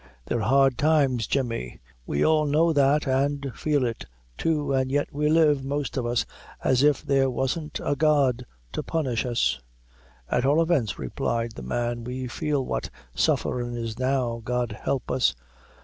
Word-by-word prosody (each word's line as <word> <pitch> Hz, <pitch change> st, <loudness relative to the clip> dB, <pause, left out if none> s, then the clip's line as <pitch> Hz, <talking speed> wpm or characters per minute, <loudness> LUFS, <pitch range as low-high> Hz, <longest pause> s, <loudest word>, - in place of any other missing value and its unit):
They're 120 Hz, -, -1 dB
hard 135 Hz, +3 st, +3 dB
times, 140 Hz, -7 st, +2 dB
Jemmy; 115 Hz, -, -2 dB, 0.3 s
we 70 Hz, -, +1 dB
all 155 Hz, -1 st, +3 dB
know 160 Hz, +3 st, +3 dB
that 145 Hz, +1 st, +3 dB
an' 140 Hz, +1 st, 0 dB
feel 145 Hz, -4 st, 0 dB
it 115 Hz, -1 st, -3 dB, 0.3 s
too, 150 Hz, -, 0 dB
and 130 Hz, 0 st, +1 dB
yet 145 Hz, +1 st, 0 dB
we 150 Hz, +1 st, +1 dB
live, 155 Hz, -3 st, +4 dB
most 140 Hz, +1 st, -3 dB
of 125 Hz, -3 st, -1 dB
us, 120 Hz, 0 st, +1 dB, 0.4 s
as 130 Hz, -1 st, +3 dB
if 145 Hz, -1 st, +3 dB
there 135 Hz, -1 st, +3 dB
wasn't 140 Hz, +5 st, -2 dB
a 145 Hz, -, 0 dB
God 140 Hz, -4 st, +2 dB, 0.3 s
ta -, -, -3 dB
punish 130 Hz, -7 st, -1 dB
us." 70 Hz, -, +1 dB, 0.7 s
"At 125 Hz, -, 0 dB
all 145 Hz, +4 st, +3 dB
events," 155 Hz, -, +1 dB
replied 115 Hz, -, -2 dB
the 110 Hz, -, -9 dB
man, 120 Hz, -, -2 dB
"we 125 Hz, +2 st, -4 dB
feel 135 Hz, +2 st, -1 dB
what -, -, -3 dB, 0.2 s
sufferin' 120 Hz, -1 st, 0 dB
is 115 Hz, 0 st, -5 dB
now, 130 Hz, -3 st, 0 dB
God 125 Hz, 0 st, -1 dB
help 120 Hz, +4 st, -3 dB
us! -, -, +2 dB
135 Hz, 165 wpm, -25 LUFS, 120-145 Hz, 0.7 s, live